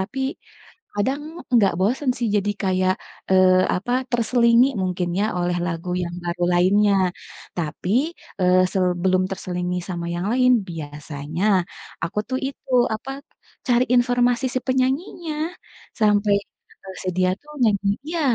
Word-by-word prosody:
tapi 250 Hz, +8 st, -4 dB, 0.8 s
kadang 265 Hz, +7 st, 0 dB, 0.3 s
enggak 205 Hz, -5 st, +5 dB
bosen 255 Hz, +7 st, +1 dB
sih 240 Hz, -, 0 dB
jadi 205 Hz, 0 st, +1 dB
kayak, 185 Hz, -1 st, +2 dB, 0.4 s
eee, 185 Hz, -1 st, +5 dB
apa 210 Hz, +7 st, -2 dB, 0.2 s
terselingi 235 Hz, 0 st, +4 dB, 0.2 s
mungkin 180 Hz, -1 st, -1 dB
ya -, -, +2 dB
oleh 175 Hz, 0 st, 0 dB
lagu 170 Hz, +1 st, -4 dB
yang 170 Hz, 0 st, -4 dB
baru 175 Hz, 0 st, -3 dB
lainnya. 200 Hz, +3 st, +4 dB, 0.6 s
Tapi, 165 Hz, +2 st, -3 dB, 0.5 s
eee, 185 Hz, 0 st, +4 dB
sebelum 185 Hz, 0 st, +2 dB
terselingi 180 Hz, -1 st, -3 dB
sama 170 Hz, -2 st, -4 dB
yang 175 Hz, +2 st, -2 dB
lain, 255 Hz, 0 st, +4 dB, 0.2 s
biasanya 150 Hz, +1 st, -5 dB, 0.6 s
aku 175 Hz, +5 st, -2 dB
tuh 260 Hz, 0 st, -1 dB
itu 270 Hz, -1 st, -9 dB, 0.2 s
apa, 250 Hz, +5 st, -6 dB, 0.6 s
cari 245 Hz, -1 st, +4 dB
informasi 245 Hz, +1 st, +2 dB
si -, -, +2 dB
penyanyinya 275 Hz, +6 st, -1 dB, 0.7 s
sampai 210 Hz, -1 st, +3 dB, 0.7 s
si -, -, -2 dB
dia 185 Hz, 0 st, +3 dB
tuh 300 Hz, -, -14 dB
nyanyi 205 Hz, -3 st, +2 dB, 0.2 s
iya, 335 Hz, 0 st, -2 dB
195 Hz, 130 wpm, -22 LUFS, 180-245 Hz, 0.8 s, enggak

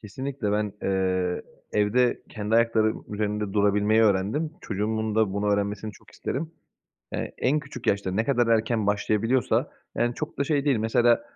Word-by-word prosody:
Kesinlikle 130 Hz, 0 st, -4 dB
ben, 105 Hz, -1 st, 0 dB
eee, 95 Hz, -2 st, 0 dB, 0.3 s
evde 110 Hz, +4 st, +2 dB
kendi 110 Hz, 0 st, -2 dB
ayaklarım 115 Hz, -1 st, +2 dB
üzerinde 105 Hz, -1 st, -2 dB
durabilmeyi 105 Hz, +1 st, +3 dB
öğrendim. 105 Hz, +10 st, +1 dB
Çocuğumun 110 Hz, +1 st, -2 dB
da 110 Hz, -3 st, +2 dB
bunu 100 Hz, +1 st, -1 dB
öğrenmesini 100 Hz, +1 st, -2 dB
çok -, -, -19 dB
isterim. 155 Hz, +5 st, -4 dB, 0.6 s
Eee, -, -, -3 dB
en 145 Hz, +4 st, +2 dB
küçük 130 Hz, -5 st, -9 dB
yaşta 100 Hz, -2 st, +1 dB
ne 110 Hz, +4 st, +1 dB
kadar 120 Hz, -4 st, +2 dB
erken 110 Hz, -1 st, +2 dB
başlayabiliyorsa 105 Hz, +4 st, +1 dB, 0.3 s
yani 120 Hz, 0 st, 0 dB
çok -, -, -5 dB
da 140 Hz, -, +3 dB
şey 145 Hz, 0 st, 0 dB
değil 135 Hz, -4 st, +3 dB
mesela, 115 Hz, +2 st, +3 dB
110 Hz, 155 wpm, -26 LUFS, 105-120 Hz, 0.6 s, durabilmeyi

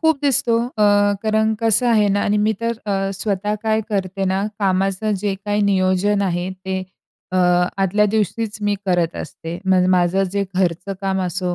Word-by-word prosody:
खूप 320 Hz, -3 st, +2 dB
दिसतो. 265 Hz, -4 st, +2 dB
अ, 220 Hz, -4 st, -2 dB, 0.4 s
कारण 220 Hz, 0 st, +1 dB
कसं 230 Hz, +2 st, +2 dB
आहे 215 Hz, -3 st, +3 dB
ना 205 Hz, -, +1 dB
आणि 210 Hz, -, +2 dB
मी 220 Hz, -, +2 dB
तर 230 Hz, 0 st, 0 dB
अ, 195 Hz, -1 st, -1 dB
स्वतः 205 Hz, +1 st, -2 dB
काय 220 Hz, 0 st, +2 dB
करते 195 Hz, -1 st, -2 dB
ना 190 Hz, +1 st, 0 dB, 0.2 s
कामाचं 195 Hz, +1 st, 0 dB
जे 200 Hz, -1 st, -1 dB
काही 205 Hz, 0 st, 0 dB
नियोजन 195 Hz, +1 st, +2 dB
आहे 175 Hz, -1 st, -1 dB, 0.2 s
ते 190 Hz, 0 st, -2 dB, 0.6 s
अ, -, -, 0 dB, 0.5 s
आदल्या 200 Hz, +3 st, +2 dB
दिवशीच 215 Hz, +1 st, -1 dB
मी 205 Hz, -, +2 dB
करत 175 Hz, -2 st, +1 dB
असते. 165 Hz, +3 st, -7 dB
मग 185 Hz, -1 st, +3 dB
माझं 185 Hz, +1 st, +2 dB
जे 200 Hz, 0 st, 0 dB
घरचं 180 Hz, +1 st, -1 dB
काम 190 Hz, -1 st, -1 dB
असो 180 Hz, 0 st, -2 dB
195 Hz, 170 wpm, -20 LUFS, 185-215 Hz, 0.6 s, आहे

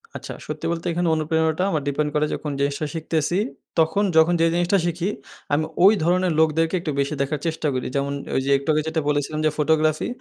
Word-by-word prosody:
আচ্ছা। -, -, -6 dB
সত্যি -, -, -5 dB
বলতে 170 Hz, +1 st, -4 dB
এখানে 175 Hz, +1 st, 0 dB
অনুপ্রেরণাটা 160 Hz, +2 st, 0 dB
আমার 155 Hz, -3 st, 0 dB
ডিপেন্ড 150 Hz, +1 st, 0 dB
করে 150 Hz, -, +2 dB
যখন 150 Hz, -, -4 dB
জিনিসটা 140 Hz, +2 st, -1 dB
শিখতেছি। 160 Hz, +2 st, -1 dB, 0.4 s
তখন 160 Hz, +6 st, +2 dB
যখন 160 Hz, +2 st, +5 dB
যে -, -, +5 dB
জিনিসটা 175 Hz, +3 st, +2 dB
শিখি 175 Hz, +1 st, -1 dB, 0.5 s
আমি 155 Hz, +2 st, +2 dB, 0.2 s
ওই 200 Hz, +3 st, +8 dB
ধরনের 180 Hz, +1 st, +2 dB
লোকদেরকে 160 Hz, +2 st, +2 dB
একটু 165 Hz, -2 st, -3 dB
বেশি 140 Hz, +2 st, 0 dB
দেখার 145 Hz, +1 st, -1 dB
চেষ্টা 160 Hz, -1 st, -2 dB
করি। 130 Hz, -1 st, -2 dB
যেমন 140 Hz, 0 st, 0 dB, 0.2 s
ওইযে 135 Hz, +1 st, 0 dB
একটু 140 Hz, +3 st, -6 dB
আগে 155 Hz, -, +2 dB
যেটা 160 Hz, 0 st, -1 dB
বলেছিলাম 150 Hz, +1 st, -1 dB
যে 155 Hz, -, +5 dB
ফটোগ্রাফি। 155 Hz, 0 st, +2 dB
160 Hz, 195 wpm, -23 LUFS, 150-165 Hz, 0.5 s, ওই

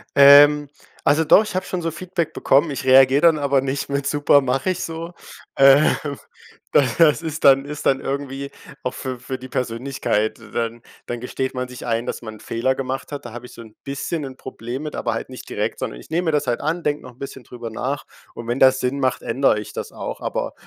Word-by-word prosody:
Ähm, 145 Hz, +1 st, +8 dB, 0.4 s
also 150 Hz, +3 st, +4 dB
doch, 205 Hz, +7 st, +6 dB
ich 210 Hz, -, -7 dB
habe 185 Hz, -, -1 dB
schon 180 Hz, -2 st, -3 dB
so 165 Hz, 0 st, -2 dB
Feedback 170 Hz, -1 st, -3 dB
bekommen. 145 Hz, +3 st, +2 dB
Ich 135 Hz, -, -5 dB
reagiere 135 Hz, +2 st, +6 dB
dann 165 Hz, -2 st, +5 dB
aber 140 Hz, -2 st, +2 dB
nicht 135 Hz, +1 st, -3 dB
mit: 140 Hz, 0 st, -1 dB
„Super 145 Hz, -1 st, +4 dB
mache 135 Hz, +6 st, -1 dB
ich 180 Hz, -, -3 dB
so.“ 165 Hz, +1 st, -6 dB, 0.4 s
Ähm, 135 Hz, +2 st, +6 dB, 0.8 s
da 145 Hz, -, +5 dB
das 160 Hz, -2 st, +5 dB
ist 155 Hz, -2 st, -5 dB
dann 135 Hz, 0 st, +6 dB
ist 150 Hz, 0 st, -7 dB
dann 135 Hz, 0 st, +3 dB
irgendwie 140 Hz, 0 st, -4 dB, 0.3 s
auch 125 Hz, -, -2 dB
für 130 Hz, -2 st, -5 dB
für 130 Hz, +1 st, -5 dB
die 130 Hz, 0 st, -11 dB
Persönlichkeit. 120 Hz, -3 st, -2 dB
Dann 115 Hz, 0 st, -3 dB, 0.3 s
dann 120 Hz, -1 st, -4 dB
gesteht 130 Hz, +2 st, -3 dB
man 125 Hz, -1 st, -3 dB
sich 125 Hz, 0 st, -9 dB
ein, 115 Hz, 0 st, -1 dB
dass -, -, -4 dB
man 110 Hz, -1 st, -7 dB
'n -, -, -15 dB
Fehler 125 Hz, +5 st, -1 dB
gemacht 135 Hz, +2 st, -4 dB
hat. 145 Hz, -, -6 dB
Da 120 Hz, -, -8 dB
habe 120 Hz, +1 st, -8 dB
ich -, -, -13 dB
so 115 Hz, -, -11 dB
'n 110 Hz, -1 st, -14 dB
bisschen 145 Hz, +3 st, -4 dB
'n 130 Hz, -1 st, -7 dB
Problem 125 Hz, +1 st, -7 dB
mit, 150 Hz, -, -6 dB
aber 120 Hz, -3 st, -2 dB
halt 115 Hz, -, -5 dB
nicht 130 Hz, -, -10 dB
direkt, -, -, -2 dB
sondern -, -, -5 dB
ich -, -, -15 dB
nehme 175 Hz, +3 st, -1 dB
mir 160 Hz, -, +2 dB
das 145 Hz, -3 st, 0 dB
halt 120 Hz, -, 0 dB
an, 165 Hz, +4 st, -1 dB
denke 150 Hz, 0 st, -1 dB
noch 125 Hz, -, -10 dB
'n 120 Hz, -, -28 dB
bisschen 135 Hz, -2 st, -8 dB
drüber 120 Hz, -1 st, -8 dB
nach 125 Hz, +5 st, -4 dB, 0.3 s
und 115 Hz, -, -9 dB
wenn 120 Hz, +2 st, -1 dB
das 130 Hz, 0 st, +5 dB
Sinn 130 Hz, +3 st, -1 dB
macht, 130 Hz, -2 st, 0 dB
ändere 115 Hz, -2 st, +1 dB
ich 105 Hz, -, -9 dB
das -, -, -6 dB
auch. -, -, -6 dB
Aber -, -, -3 dB
135 Hz, 230 wpm, -21 LUFS, 125-145 Hz, 0.8 s, Ähm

